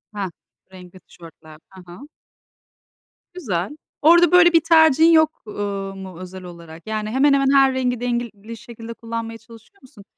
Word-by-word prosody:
Heh 195 -2 -4 0.4
renkli 185 0 -14
tişörtler. 160 -2 -16
Hı 190 - -13
hı. 240 +12 -13 1.3
Güzel. 225 - -4 0.2
Orada 340 +2 +5
böyle 350 -1 +5
bir 330 - +5
tercihin 320 -1 +4
yok, 315 -1 +2
uuu, 200 -2 -5
mu 190 -3 -10
özel 185 0 -10
olarak? 170 0 -13
Yani 215 -1 -4
hemen 270 +5 +2
hemen 275 -1 +1
her 270 -1 +4
rengi 250 -2 -2
dengeli 235 -3 -5
şekilde 230 +1 -11
kullanmaya 230 0 -7
çalışıyor 230 - -19
musun? 240 -5 -17
230 Hz, 145 wpm, -20 LUFS, 190-275 Hz, 1.3 s, Orada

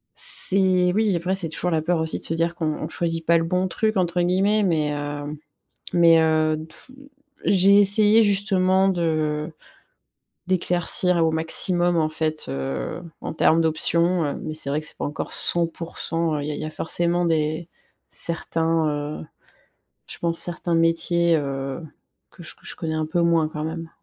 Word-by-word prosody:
C'est 185 -2 +4
oui, 210 -3 +1
après, 180 +3 -2
c'est 190 -4 -1
toujours 180 +3 -3
la 160 -2 0
peur 170 +2 0
aussi 160 0 -3
de - - -5
se 165 - -1
dire 170 +1 -1
qu'on 165 -2 -4
on 155 0 -3
choisit 165 -1 -3
pas 170 +1 +3
«le 165 - -2
bon 180 +3 -1
truc» 215 +3 -2
entre 175 -1 0
guillemets, 195 +4 +1
mais 155 -6 0
heu, 145 +1 -6 0.5
mais 165 -2 +5
heu, 155 -1 +1
tou 210 +10 -17 0.5
j'ai 195 +1 +4
essayé 210 +2 +6
justement 195 -2 +2
de 155 -3 -2 1.0
d'éclaircir 175 -1 +2
au 160 - +2
maximum 175 +2 +1
en 155 -2 +1
fait, 155 0 -2
heu, 70 - -5 0.2
en - - -5
termes 165 +1 +2
d'options, 170 +2 +2
heu, 145 - -3
mais 155 - -5
c'est 155 - -4
vrai 145 +2 -1
que 155 - -9
c'est - - -13
pas - - -4
encore 145 - -6
100% 165 -1 0
Il 145 - -5
y - - -3
a - - -5
il - - -7
y - - -5
a - - -6
forcément 175 +2 -1
des 160 0 -1 0.4
certains, 165 -1 0
heu, 145 +1 -5 0.8
je - - -8
pense 170 -1 -1
certains 175 0 -2
métiers, 165 +1 +2
heu, 135 -1 -4 0.5
que 175 - -15
je 160 - -8
que - - -18
je - - -6
connais 160 -1 -4
un 155 0 -2
peu 165 +3 -1
moins 165 -2 +2
quand 155 0 -6
même. 165 +1 -6
165 Hz, 180 wpm, -22 LUFS, 155-180 Hz, 1.0 s, essayé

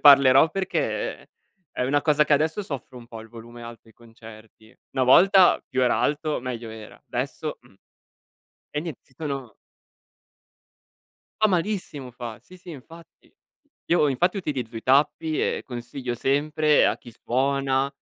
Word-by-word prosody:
parlerò 140 +1 +7
perché 190 +2 -2 0.4
è 125 - -2
una 145 +2 +1
cosa 150 -1 +3
che 150 - 0
adesso 155 +6 +2
soffro 135 -6 -7
un 120 - -13
po' 115 -2 -9
il 110 - -13
volume 120 +1 -12
alto 115 0 -11
ai 110 - -20
concerti. 110 -1 -16 0.2
Una 130 -2 +2
volta 190 +7 +6
più 130 - -1
era 125 - +2
alto 150 -1 0
meglio 120 -2 -5
era, 110 -1 -11
adesso - - -4
mh. - - -23 1.0
E 150 - -2
niente 160 -5 -7
si - - -30
sono 135 -7 -5 1.8
Fa 215 - +6
malissimo 180 -8 -2
fa. 120 -2 -8
Sì, 185 - -16
sì 180 -1 -12
infatti. 165 +4 -14 0.5
Io 165 -3 +3
infatti 175 +9 +1
utilizzo 125 -9 -4
i 110 - -6
tappi, 150 +4 +2
e - - -1
consiglio 120 0 -5
sempre 150 +3 +2
a - - +2
chi 120 - -13
suona, 135 +2 0
135 Hz, 150 wpm, -24 LUFS, 120-155 Hz, 1.8 s, parlerò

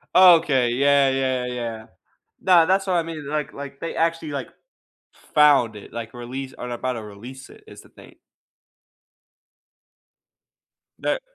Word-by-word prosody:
Okay, 160 -9 +6
yeah, 140 +2 +3
yeah, 130 -1 -1
yeah. 120 -3 -5 0.6
No, 175 -3 +5
that's 195 +2 +1
what 185 - 0
I 170 - +2
mean, 160 -3 -7
like 150 -1 -3
like, 140 0 -9
they 165 - -5
actually, 165 -2 -1
like, 140 - -4 0.9
found 140 -7 +5
it, 105 - -12
like, 115 0 -7
release 130 +2 -7
or 125 - -7
about 125 +1 -3
to 115 - -6
release 120 +6 -11
it, - - -17
is 435 - -13
the - - -20
thing. - - -17 2.8
That - - -2
135 Hz, 145 wpm, -23 LUFS, 125-160 Hz, 2.8 s, Okay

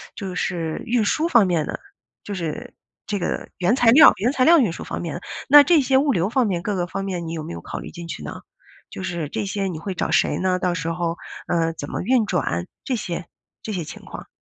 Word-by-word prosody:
就 190 -3 -5
是 165 -3 -2
运 240 -1 +1
输 310 +10 +1
方 235 - +5
面 165 -4 +1
的， - - -5 0.4
就 205 - -5
是 165 -4 -5 0.3
这 205 0 -1
个 180 - -3
原 185 +6 +2
材 245 -3 +4
料 285 +6 +9
原 230 +7 +1
材 255 -3 +2
料 335 +1 +7
运 225 - +2
输 - - -7
方 - - -5
面 165 -4 -4
的， 175 - -6 0.3
那 290 +1 +9
这 325 -1 +4
些 265 0 +3
物 280 +1 +3
流 180 -2 +1
方 250 +1 +2
面 180 -5 -1
各 205 +1 -2
个 175 -2 0
方 195 +2 -4
面 180 -4 -4
你 165 - -4
有 160 - -4
没 - - -7
有 85 - -7
考 - - -6
虑 65 - -8
进 170 0 -9
去 - - -6
呢？ - - -7 0.5
就 - - -7
是 170 -4 -3
这 200 - -3
些 200 0 -2
你 170 -4 -4
会 185 +3 -5
找 - - -2
谁 - - +2
呢， 185 -1 0
到 180 -1 0
时 165 -1 -3
候 170 0 -2 0.3
呃， 165 -1 +1
怎 145 -3 -7
么 - - -3
运 240 +2 +3
转， 90 - -1 0.2
这 260 - -1
些 175 -5 -4 0.4
这 215 - -4
些 180 -3 -2
情 155 - -10
况？ - - -9
185 Hz, 270 characters per minute, -22 LUFS, 170-230 Hz, 0.5 s, 料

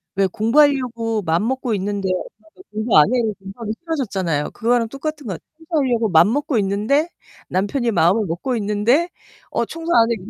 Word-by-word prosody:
왜 195 -1 +3
공부하려고 230 -1 +2
마음먹고 225 +9 0
있는데 195 0 -2
엄마가 215 - -7
"공부 215 +2 +1
안 150 - +8
해?" 255 - +3
이러면 220 -3 0
공부하기 205 +3 -6
싫어졌잖아요. 195 - -2
그거랑 235 -1 +1
똑같은 290 0 -5
것 190 - -2
같 - - -9 0.2
청소하려고 270 - 0
마음 175 +7 +5
먹고 290 -3 0
있는데 215 - +1 0.4
남편이 230 +6 0
마음을 190 +4 +3
먹고 185 +9 -2
있는데 220 - +1 0.4
"어, - - 0
청소 330 +1 -5
안 230 0 +5
해?" - - +2
225 Hz, 400 characters per minute, -20 LUFS, 195-265 Hz, 0.4 s, 안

